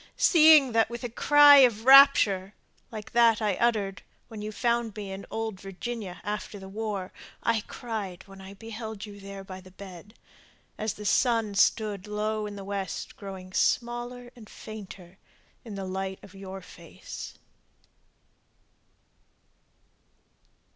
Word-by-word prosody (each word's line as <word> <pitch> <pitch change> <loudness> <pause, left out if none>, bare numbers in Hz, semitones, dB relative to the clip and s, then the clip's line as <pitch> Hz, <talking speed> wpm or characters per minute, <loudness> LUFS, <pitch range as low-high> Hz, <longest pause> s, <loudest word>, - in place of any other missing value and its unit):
Seeing 310 -5 +6
that 225 -1 +2
with 235 +1 -7
a 245 - -3
cry 290 +3 +7
of 240 -5 +4
rapture, 225 -8 +6 0.3
like 215 -2 -9
that 235 -2 +4
I 210 -3 0
uttered 210 -5 0 0.3
When 220 -3 -8
you 210 +1 -5
found 235 -1 -1
me 205 -2 -6
in 195 +1 -8
old 220 -3 -4
Virginia 195 0 -7
after 210 0 -5
the 190 -1 -10
war, 200 -2 -5 0.3
I 230 -2 +1
cried 210 -7 -6
when 195 0 -13
I 190 +1 -11
beheld 220 0 -7
you 205 -1 -12
there 195 0 -9
by 185 -1 -10
the 185 - -15
bed, 190 +2 -12 0.6
As 215 -1 -3
the 210 - -9
sun 225 0 +2
stood 205 -1 +1
low 210 0 -2
in 205 - -8
the 195 -1 -8
west 195 -2 -5
growing 190 -2 -9
smaller 240 +2 -1
and 220 -3 -14
fainter 190 -4 -11 0.4
In 220 -4 -8
the 195 -1 -5
light 190 0 -4
of 195 - -14
your 195 0 -9
face! 170 -2 -10
210 Hz, 140 wpm, -27 LUFS, 195-230 Hz, 0.6 s, cry